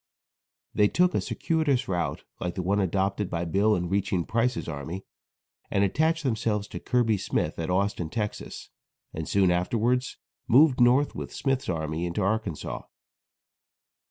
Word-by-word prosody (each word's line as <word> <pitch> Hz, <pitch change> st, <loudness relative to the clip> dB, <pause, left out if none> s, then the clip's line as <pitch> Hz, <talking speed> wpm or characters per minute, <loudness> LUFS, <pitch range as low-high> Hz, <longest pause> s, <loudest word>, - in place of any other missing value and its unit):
They 105 Hz, -, +4 dB
took 180 Hz, -, +2 dB
a -, -, +1 dB
circuitous 150 Hz, -6 st, 0 dB
route 90 Hz, -2 st, -2 dB, 0.2 s
like 90 Hz, -1 st, -3 dB
the 90 Hz, -, -2 dB
one 100 Hz, +3 st, +1 dB
adopted 95 Hz, +1 st, 0 dB
by 85 Hz, 0 st, -2 dB
Bill 100 Hz, +6 st, +2 dB
in 90 Hz, 0 st, -2 dB
reaching 95 Hz, -2 st, 0 dB
Price's 120 Hz, +2 st, 0 dB
army, 80 Hz, +5 st, -5 dB, 0.6 s
and 100 Hz, -, +2 dB
attached 160 Hz, -, +1 dB
themselves 110 Hz, -5 st, 0 dB
to -, -, -6 dB
Kirby 115 Hz, -5 st, +1 dB
Smith -, -, -2 dB
at 80 Hz, -, -2 dB
Austin, 90 Hz, -3 st, 0 dB
Texas, 105 Hz, +3 st, -5 dB, 0.4 s
and 80 Hz, 0 st, -5 dB
soon 95 Hz, -3 st, +3 dB
afterwards 115 Hz, +8 st, 0 dB, 0.3 s
moved 130 Hz, 0 st, +5 dB
north 125 Hz, +4 st, +4 dB
with -, -, -6 dB
Smith's 135 Hz, -5 st, -1 dB
army 80 Hz, 0 st, -2 dB
into 85 Hz, +4 st, -2 dB
Arkansas. 100 Hz, -5 st, -2 dB
100 Hz, 145 wpm, -27 LUFS, 90-125 Hz, 0.6 s, moved